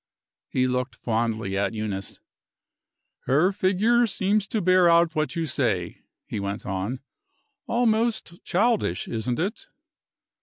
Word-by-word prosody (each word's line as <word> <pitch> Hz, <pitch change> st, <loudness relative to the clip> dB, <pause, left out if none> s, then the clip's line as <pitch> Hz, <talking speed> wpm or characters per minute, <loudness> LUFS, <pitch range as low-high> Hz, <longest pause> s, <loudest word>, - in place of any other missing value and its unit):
He 130 Hz, -1 st, +1 dB
looked 125 Hz, -2 st, -1 dB
fondly 110 Hz, -3 st, -1 dB
at 100 Hz, +2 st, -1 dB
Eunice. 100 Hz, -3 st, -4 dB, 1.1 s
"Her 155 Hz, +9 st, +4 dB
figure 210 Hz, +6 st, +2 dB
seems 200 Hz, +1 st, 0 dB
to 220 Hz, -, -1 dB
bear 185 Hz, -2 st, +4 dB
out 170 Hz, 0 st, +4 dB
what 155 Hz, +1 st, -1 dB
you 165 Hz, -1 st, -1 dB
say," 110 Hz, -, -1 dB, 0.2 s
he -, -, -4 dB
went 100 Hz, +1 st, -4 dB
on. 95 Hz, +7 st, -3 dB, 0.7 s
"Almost 225 Hz, -6 st, 0 dB
childish, 210 Hz, -, +1 dB
isn't 115 Hz, +2 st, -2 dB
it?" 195 Hz, +8 st, -3 dB
155 Hz, 120 wpm, -25 LUFS, -, 1.1 s, Her